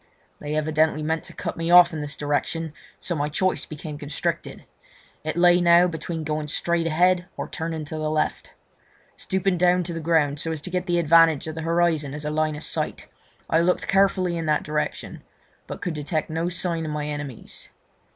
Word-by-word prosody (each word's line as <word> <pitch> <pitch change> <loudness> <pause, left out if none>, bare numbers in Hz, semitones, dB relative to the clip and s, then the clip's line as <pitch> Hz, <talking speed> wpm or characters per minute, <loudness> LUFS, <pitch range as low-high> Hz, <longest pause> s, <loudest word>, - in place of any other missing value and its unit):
They 150 +1 -4
evidently 155 0 +1
meant 160 +1 -1
to - - -7
cut - - -4
me 165 0 -2
off 175 0 +8
in 155 - -3
this 145 0 -5
direction, 145 +3 -1
and 160 -2 -7 0.2
so 175 - -3
my 150 -2 -1
choice 185 +5 0
became 150 -1 -7
constricted; 145 0 -4 0.6
it 155 +2 -3
lay 175 0 +5
now 170 0 +6
between 165 -1 -4
going 155 0 -2
straight 170 +2 0
ahead 175 +2 +2
or - - -4
turning 160 -1 -4
to 155 +2 -6
the 155 0 -1
left. 155 0 -2 0.6
Stooping 190 -1 -1
to 180 -1 +2
the 165 - -4
ground, 155 -3 +1
so 165 - -2
as 160 - -3
to 180 - -5
get 180 0 -2
the 175 -1 +1
advantage 165 -2 +5
of 160 - -5
the 160 - -5
horizon 165 -3 +1
as 150 0 -6
a 150 - -1
line 155 0 0
of 150 - -5
sight, - - -2 0.4
I 160 - +3
looked 180 +2 +1
carefully 190 -3 +2
in 160 - -3
this 150 -1 +2
direction, 150 0 -3 0.5
but - - -7
could 175 - -2
detect 155 +1 -3
no 165 +2 -1
sign 170 -2 -2
of 155 - -4
my 150 0 -3
enemies. 145 -5 -5
160 Hz, 200 wpm, -24 LUFS, 150-175 Hz, 0.6 s, off